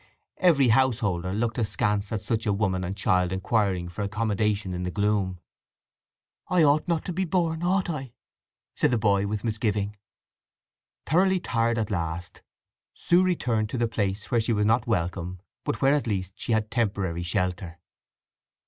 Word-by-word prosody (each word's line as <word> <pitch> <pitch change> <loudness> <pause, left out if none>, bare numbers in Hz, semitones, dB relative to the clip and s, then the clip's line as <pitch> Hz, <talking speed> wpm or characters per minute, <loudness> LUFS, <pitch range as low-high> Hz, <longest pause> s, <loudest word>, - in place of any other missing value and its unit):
Every 145 -8 +4
householder 110 -8 +2
looked 115 +4 -1
askance 105 -2 0
at 110 -3 -2
such 115 +1 -2
a 100 - +3
woman 95 -2 0
and 95 +2 -4
child 90 -2 +2
inquiring 95 -2 0
for 90 +4 -6
accommodation 105 -1 -1
in 90 - -3
the 90 - -2
gloom. 100 -2 0 1.1
"I 180 -2 +3
ought 150 +2 +3
not 170 -2 0
to 180 - -3
be 190 +3 0
born, 165 -2 0
ought 185 +2 +1
I?" 135 -7 -5 0.6
said - - +2
the 120 - +2
boy 100 -2 +2
with 105 0 -3
misgiving. 105 -2 -1 1.1
Thoroughly 185 +4 +3
tired 115 -6 0
at 110 -1 -1
last 85 -1 -4 0.5
Sue 175 +1 +3
returned 120 -12 0
to 125 - -3
the 120 -1 +1
place 100 -3 -2
where 120 - +3
she 115 +1 0
was 105 -1 +1
not 115 +2 +2
welcome, 90 -3 -2 0.2
but - - -2
where 135 +1 +5
at 145 -4 0
least 95 -3 -2
she - - -4
had 110 0 0
temporary 100 -7 -1
shelter. 90 -1 -2
105 Hz, 165 wpm, -26 LUFS, 95-120 Hz, 1.1 s, where